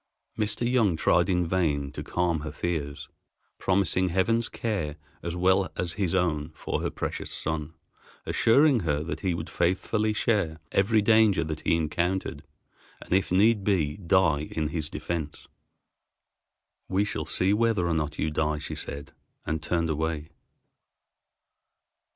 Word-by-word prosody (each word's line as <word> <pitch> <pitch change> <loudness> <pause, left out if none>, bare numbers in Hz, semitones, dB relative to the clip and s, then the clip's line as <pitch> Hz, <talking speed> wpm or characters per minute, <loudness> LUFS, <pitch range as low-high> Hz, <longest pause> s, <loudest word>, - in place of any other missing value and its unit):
Mr. 110 +2 0
Young 115 -8 +3
tried 85 +3 +3
in 90 -1 +2
vain 75 -6 0
to - - -6
calm 85 -2 0
her 75 +1 -5
fears, 75 -2 -3 0.5
promising 95 -1 +1
Heaven's 115 +6 +1
care 95 -10 -2 0.3
as 85 0 -4
well 95 +2 +2
as 85 -2 -1
his 95 -1 -1
own 80 -4 0
for - - -3
her - - -1
precious - - -4
son, 80 0 -3 0.5
assuring 135 +2 +4
her 75 -5 -1
that 85 - -4
he 90 -3 0
would 80 -1 -5
faithfully 100 +5 0
share 105 -7 0
every 105 +2 +3
danger 110 -5 +4
that 80 -1 -4
he - - +2
encountered, 85 0 -1 0.6
and - - -5
if 95 -1 +2
need 105 +3 +4
be 80 -8 +1
die 85 -5 +2
in 80 -2 0
his 80 -2 -3
defense. 80 -4 -5 1.4
"We 95 +2 +2
shall 80 -6 -4
see 95 +5 +2
whether 110 -5 +2
or 85 - +1
not 75 -2 -2
you 80 - -1
die," 75 0 0
she 75 - -6
said, 70 0 -6 0.3
and 80 +1 -2
turned 85 +1 0
away. 80 0 -2
85 Hz, 145 wpm, -27 LUFS, 80-100 Hz, 1.4 s, assuring